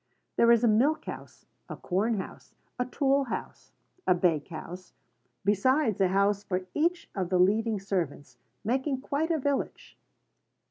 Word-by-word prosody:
There 235 0 +5
is 235 0 +5
a - - +5
milk 255 +9 +3
house, - - -9 0.2
a - - -6
corn 210 +5 0
house, 190 - -8 0.2
a 250 - 0
tool 275 +1 +2
house, 245 - -6 0.4
a 180 - +5
bake 170 -4 +1
house, 180 +2 -9 0.5
besides 215 +2 +2
a 190 - +5
house 200 +2 +2
for 185 -2 -2
each 340 +3 0
of 185 -3 -2
the 185 - +2
leading 210 +4 +2
servants, 160 -9 -3 0.3
making 260 +3 -1
quite 290 +4 -1
a 330 - +2
village. 285 -1 -3
215 Hz, 150 wpm, -28 LUFS, 185-265 Hz, 0.5 s, There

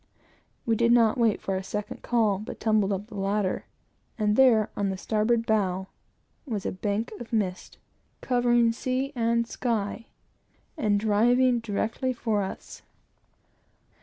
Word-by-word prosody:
We 230 - +2
did 235 +1 +3
not 235 0 +4
wait 225 -3 +2
for 195 - -1
a 190 - -3
second 210 +2 -5
call, 220 -5 +1
but 215 - -8
tumbled 215 -3 +2
up 195 +1 -2
the 220 - -15
ladder; 195 -1 -1 0.5
and 210 -2 +1
there, 235 -5 +4
on 200 -1 -1
the 190 - -3
starboard 225 +3 0
bow, 190 -4 0 0.6
was 215 -6 -3
a - - -1
bank 205 +4 -2
of 240 - -9
mist, 195 -5 -2 0.4
covering 240 -2 +2
sea 260 +4 -2
and 235 0 +1
sky, 230 -2 -3 0.7
and 210 -10 +1
driving 240 +4 +3
directly 230 +4 -2
for 220 -4 -1
us. 190 - -7
220 Hz, 140 wpm, -26 LUFS, 205-235 Hz, 0.7 s, not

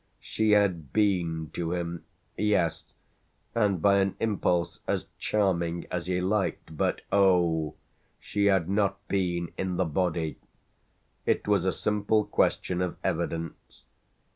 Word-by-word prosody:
She 110 -1 +1
had 90 -9 +2
been 85 -6 +1
to 85 0 -2
him 85 -1 -4 0.3
yes, 105 -6 +1 0.7
and 100 -7 +1
by 100 -1 +5
an 95 -1 +1
impulse 90 -7 0
as - - -1
charming 85 -5 0
as 90 -1 -3
he 90 -1 0
liked; 95 -4 -1
but - - 0
oh! 85 -6 +3 0.4
she 100 0 -1
had 95 -5 +3
not 100 0 0
been 85 -3 -1
in 95 -2 -1
the 95 - +2
body. 80 -1 -1 0.9
It - - +1
was 100 -3 +2
a 95 - +3
simple 105 +1 +1
question 90 0 +1
of 90 -1 -2
evidence. 85 -1 -3
90 Hz, 130 wpm, -28 LUFS, 85-100 Hz, 0.9 s, by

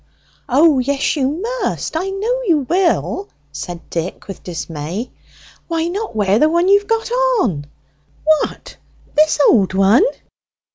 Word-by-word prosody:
"O 285 +2 +4
yes, 275 +4 0
you 270 -3 +1
must; 440 - -3
I 365 +4 -1
know 445 +6 -1
you 305 -6 +2
will!" 375 +3 0 0.2
said 175 -2 -7
Dick, 170 +2 -4
with 195 - -8
dismay. 170 - -5 0.6
"Why 330 0 -1
not 410 - -4
wear 210 +8 +3
what 340 +2 +2
you've 405 +1 +4
got 455 +1 -1 0.3
on?" 150 - -1 0.6
"What! 310 0 0 0.4
this 310 +1 +4
old 195 -4 +3
one! 195 - +5
305 Hz, 130 wpm, -18 LUFS, -, 0.6 s, one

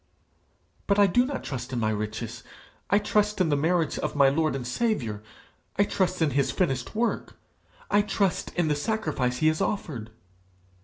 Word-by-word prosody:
'But 200 - +3
I 205 - +7
do 245 +7 +3
not 280 -1 -4
trust 125 -1 -5
in 125 - -1
my 110 -1 +1
riches; 110 +2 -4 0.5
I 200 - +5
trust 210 0 +1
in 180 -3 +3
the 145 - +3
merits 165 +2 +1
of - - -3
my 140 -2 +6
Lord 155 +1 +1
and 130 -2 -4
Saviour. 125 - -1 0.5
I 200 - +4
trust 185 -3 0
in 150 - +2
his 140 +1 +1
finished 135 -7 -1
work, 230 +1 -1 0.6
I 205 - +5
trust 200 -3 0
in 175 -2 +1
the 150 - +2
sacrifice 145 - -1
he 155 - +2
has 155 - -1
offered.' 125 - -2
155 Hz, 175 wpm, -27 LUFS, 125-200 Hz, 0.6 s, I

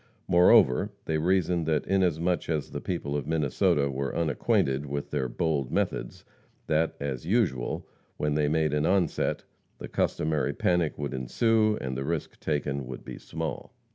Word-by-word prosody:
Moreover, 85 -1 +5 0.2
they 80 -1 0
reasoned 90 -1 +1
that 80 -2 +1
inasmuch 90 -3 +1
as 75 -3 -1
the - - -5
people 75 -5 -3
of 75 - -3
Minnesota 75 -2 +2
were 70 +1 -3
unacquainted 70 -4 +1
with 70 +1 -4
their 65 - -1
bold 70 0 -1
methods, - - -2 0.4
that, 80 +1 +1
as 70 +1 -4
usual, 90 - 0 0.3
when 75 0 0
they 75 0 +2
made 80 0 +1
an 75 +1 +1
onset, 95 -3 +1 0.3
the - - -7
customary 75 -1 0
panic 85 -3 +1
would 70 -2 -3
ensue, 110 - +2
and 65 -1 -4
the 65 - -3
risk 80 +1 -3
taken 70 -3 -2
would 65 -1 -8
be - - -8
small. - - -5
75 Hz, 155 wpm, -28 LUFS, 70-85 Hz, 0.4 s, Moreover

